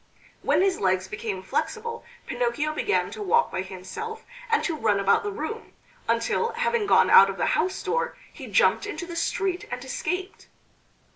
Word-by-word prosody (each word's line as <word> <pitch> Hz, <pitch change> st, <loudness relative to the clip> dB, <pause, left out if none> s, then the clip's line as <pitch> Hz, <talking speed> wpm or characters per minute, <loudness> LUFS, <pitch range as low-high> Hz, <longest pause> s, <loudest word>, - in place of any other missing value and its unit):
When -, -, +3 dB
his 385 Hz, -2 st, +1 dB
legs 185 Hz, -1 st, +1 dB
became 190 Hz, -1 st, -4 dB
flexible 460 Hz, -, -3 dB, 0.2 s
Pinocchio 385 Hz, -12 st, -1 dB
began 415 Hz, +6 st, 0 dB
to -, -, -7 dB
walk 465 Hz, +4 st, +2 dB
by -, -, -2 dB
himself 190 Hz, -, -7 dB, 0.2 s
and 455 Hz, -, +2 dB
to 330 Hz, -, -1 dB
run 215 Hz, -8 st, +1 dB
about 200 Hz, 0 st, +3 dB
the 415 Hz, -, -3 dB
room; 445 Hz, +2 st, -6 dB, 0.3 s
until, 460 Hz, 0 st, +1 dB
having 470 Hz, -2 st, 0 dB
gone -, -, +5 dB
out 470 Hz, -, +9 dB
of -, -, -5 dB
the -, -, +1 dB
house 360 Hz, +5 st, 0 dB
door, -, -, -1 dB, 0.2 s
he -, -, -9 dB
jumped 465 Hz, -3 st, +3 dB
into 390 Hz, -3 st, -5 dB
the 340 Hz, -1 st, -7 dB
street 380 Hz, +3 st, -1 dB
and 250 Hz, +2 st, -5 dB
escaped. 360 Hz, +8 st, -4 dB
380 Hz, 170 wpm, -26 LUFS, -, 0.3 s, out